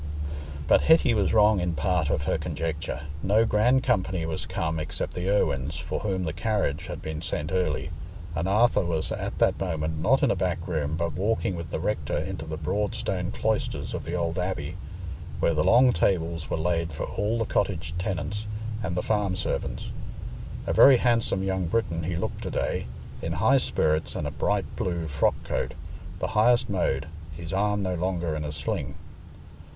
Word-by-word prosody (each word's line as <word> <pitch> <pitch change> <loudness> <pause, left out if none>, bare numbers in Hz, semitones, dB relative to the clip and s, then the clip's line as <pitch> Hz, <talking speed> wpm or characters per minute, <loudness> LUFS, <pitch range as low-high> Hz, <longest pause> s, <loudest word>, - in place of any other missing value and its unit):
But - - +6
Hetty 160 -6 +5
was 105 -3 +2
wrong 105 -2 +5
in 90 -1 -1
part 90 -4 +1
of - - 0
her - - 0
conjecture. 75 -4 -3 0.2
No 105 +5 +4
grand 120 +5 +3
company 95 -4 +1
was 80 -1 -3
come 80 -1 -1
except 75 - -3
the 90 +2 -2
Irwines, 75 -8 +1
for 80 -1 -3
whom 95 -3 -1
the 80 -3 -2
carriage 95 -5 -1
had - - -6
been 80 0 -4
sent 75 -2 -3
early, 80 -5 0 0.4
and 85 +3 0
Arthur 110 +4 +4
was 80 -2 -1
at - - -3
that - - +3
moment 80 -4 -2
not 125 +12 +3
in - - +4
a - - +2
back 90 -1 -1
room, 80 -3 -1
but 85 -1 -1
walking 100 +2 0
with 85 -2 -6
the - - -2
rector 80 -6 -1
into 80 +1 -4
the 80 0 -4
broad 100 +7 -1
stone 90 -1 -2
cloisters 110 -1 -1
of - - -3
the 85 - -3
old 85 0 -1
abbey, 90 -3 -2 0.6
where 85 - +3
the 75 -1 +2
long 125 +5 +6
tables 85 -3 0
were - - 0
laid 85 0 0
for 75 - -4
all 105 +3 -1
the 115 - 0
cottage 85 -7 -1
tenants 100 +4 -3 0.3
and 95 -4 -2
the 90 - 0
farm 105 -4 +1
servants. 95 - -3 0.7
A - - 0
very 135 -2 +8
handsome 115 -6 +2
young 95 -2 0
Briton 85 -4 0
he 90 +1 -1
looked 85 - -3
to - - -3
day, - - -1 0.3
in - - -2
high - - +4
spirits 80 +1 +1
and 85 -5 -2
a 75 - -2
bright - - 0
blue 85 -3 -2
frock 70 - +2
coat, - - -2 0.4
the - - -2
highest 120 +2 +3
mode—his 80 0 -3
arm 105 +1 +1
no 95 -1 0
longer 85 -2 -1
in 75 - -3
a 75 - -3
sling. 70 -1 -3
90 Hz, 185 wpm, -27 LUFS, 80-100 Hz, 0.7 s, very